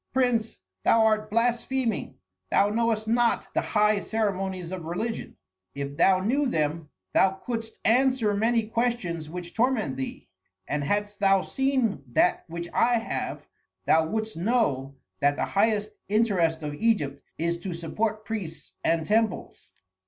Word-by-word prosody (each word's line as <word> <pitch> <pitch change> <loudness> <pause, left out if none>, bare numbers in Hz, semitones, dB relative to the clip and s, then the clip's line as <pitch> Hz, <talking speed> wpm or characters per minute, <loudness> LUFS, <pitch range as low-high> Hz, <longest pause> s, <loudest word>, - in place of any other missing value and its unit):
"Prince, 245 -4 +1 0.3
thou 225 -1 +5
art 215 -1 +2
blaspheming, 235 +1 0 0.3
thou 200 - +3
knowest 220 0 0
not 235 +1 +1
the - - +2
high 210 -1 +2
ceremonies 195 -5 -2
of 185 -3 -5
religion. 220 +8 -4 0.4
If 140 0 -4
thou 185 +4 +4
knew 270 +8 +1
them 155 -5 -1 0.2
thou 190 0 +4
couldst 225 +2 -5
answer 250 -2 +3
many 225 +2 +2
questions 220 -9 -1
which 175 +1 -7
torment 225 - +1
thee; 130 - -5 0.4
and 150 -1 -1
hadst 205 +5 -1
thou 195 -2 +4
seen 260 - 0
that 180 - +3
which 170 +1 -5
I 240 +1 +3
have, 225 0 -3 0.4
thou 160 0 +4
wouldst 220 +1 -3
know 165 - 0 0.2
that 145 0 +3
the - - -1
highest 210 +1 +1 0.2
interest 185 -7 +2
of 150 -1 -3
Egypt 145 -7 0 0.2
is 170 +1 -1
to 185 +2 -5
support 215 +6 -2
priests 195 -8 -5
and 165 -1 +1
temples." 215 -1 -1
210 Hz, 140 wpm, -26 LUFS, 170-230 Hz, 0.4 s, thou